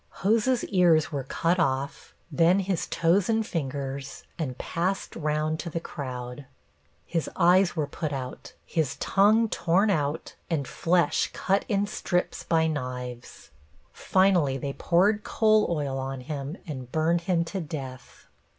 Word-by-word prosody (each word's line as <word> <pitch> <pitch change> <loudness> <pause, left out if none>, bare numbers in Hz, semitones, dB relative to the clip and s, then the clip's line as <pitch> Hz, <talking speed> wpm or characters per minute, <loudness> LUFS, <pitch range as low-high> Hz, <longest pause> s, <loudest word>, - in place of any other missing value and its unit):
Hose's 230 +4 +3
ears 170 -5 +3
were 140 -3 -3
cut 170 +6 0
off, 135 -3 -1 0.2
then 170 +6 +4
his 190 -2 -2
toes 175 +4 +2
and 225 -1 +2
fingers, 140 -4 -4 0.2
and 130 -6 -3
passed 185 +3 -2
round 155 0 -1
to 170 - -4
the 165 - -3
crowd. 130 -4 -7 0.6
His 165 -2 -2
eyes 180 +1 +4
were 155 -3 0
put 155 +1 -4
out, 130 -2 -6
his 160 -6 -1
tongue 215 +3 +3
torn 195 +2 +2
out 150 -2 -1 0.2
and 145 -6 -1
flesh 175 +1 +1
cut 195 +1 0
in 200 -1 +1
strips 180 -3 -2
by 160 -1 +2
knives. 125 -5 -5 0.4
Finally 180 -8 +2
they 140 +1 -4
poured 205 +8 +2
coal 215 -1 +3
oil 145 -5 -1
on 135 0 -4
him 140 +4 -5
and 130 -7 -7
burned 165 +2 +2
him 170 -2 +2
to 190 +3 -4
death. 135 -5 -8
160 Hz, 140 wpm, -27 LUFS, 140-185 Hz, 0.6 s, then